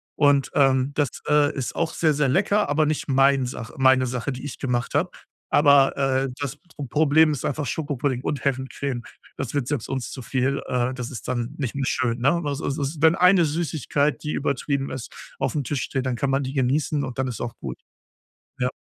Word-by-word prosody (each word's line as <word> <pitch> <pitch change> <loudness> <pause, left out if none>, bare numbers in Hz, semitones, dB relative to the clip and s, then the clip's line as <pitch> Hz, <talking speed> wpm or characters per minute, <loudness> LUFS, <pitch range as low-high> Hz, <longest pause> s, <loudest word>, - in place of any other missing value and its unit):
Und, 145 -2 +3
ähm, 135 0 +3
das, 145 -4 +2 0.2
äh, 150 0 +4
ist 130 -4 -3
auch 165 -1 -1
sehr, 155 -2 +2
sehr 150 -1 +1
lecker, 205 +5 +2
aber 155 +1 +2
nicht 155 0 -1
mein 135 -1 +4
Sache 125 -2 -7
meine 130 -1 +4
Sache, 125 +3 -3
die 130 - -8
ich 145 -3 -6
gemacht 125 -3 -1
habe, - - +1 0.4
aber, 140 -2 +5
äh, 135 -1 +1
das 140 0 -3 0.3
Problem 155 +2 +4
ist 145 - -3
einfach 145 0 -2
Schokopudding 140 -2 -2
und 140 -1 -3
Herrencreme, 135 -1 -2 0.4
das - - -4
wird 140 -4 -1
selbst 145 -7 -2
uns 130 -2 -3
zu 130 - -7
viel, 135 +2 -1
äh, 125 0 0
das 125 -2 -5
ist 125 - -8
dann 125 +2 -2
nicht 135 -6 -3
mehr 140 -1 -1
schön, 120 -2 0
ne? 140 +7 +2
Also, 140 0 -2
so 140 +1 -2 0.2
wenn 160 +1 +6
eine 180 -2 +5
Süßigkeit, 150 -2 -1
die 150 - -2
übertrieben 140 0 -1
ist, 130 -2 -6 0.3
auf'm 135 +2 -1
Tisch 140 0 -2
steht, 130 -1 -3
dann 125 -2 -1
kann 135 +3 0
man 135 +1 +1
die 130 - -4
genießen 140 +2 +1
und 130 -3 -7
dann 135 - +1
ist 120 - -6
auch 120 -1 -4
gut. 65 -3 -6 0.8
Ja. 125 - +1
135 Hz, 205 wpm, -24 LUFS, 130-145 Hz, 0.8 s, wenn